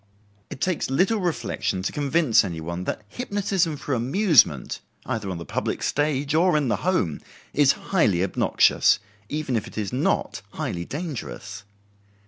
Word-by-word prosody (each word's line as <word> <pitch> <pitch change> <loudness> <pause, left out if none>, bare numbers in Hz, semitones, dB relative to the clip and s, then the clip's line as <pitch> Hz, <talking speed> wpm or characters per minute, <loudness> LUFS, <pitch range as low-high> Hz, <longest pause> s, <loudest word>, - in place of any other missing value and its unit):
It - - -8
takes 185 -7 0
little 190 +11 +2
reflection 120 - -2
to - - -1
convince 145 -4 +3
any 85 -5 -4
one 85 +3 -5
that - - -3
hypnotism 195 - -1
for 140 - -3
amusement, 140 - +3 0.3
either 105 -4 -3
on 90 - -3
the 85 - -7
public - - -3
stage 145 -1 0
or 170 0 +4
in 145 -4 0
the - - +1
home, 170 - 0 0.3
is 145 -1 +5 0.2
highly 100 - +3
obnoxious, 95 - +3 0.3
even 150 -4 -2
if 110 - -1
it - - -12
is 105 -1 -3
not 130 - 0
highly 85 0 -3
dangerous. 110 - -6
140 Hz, 150 wpm, -24 LUFS, 100-170 Hz, 0.3 s, is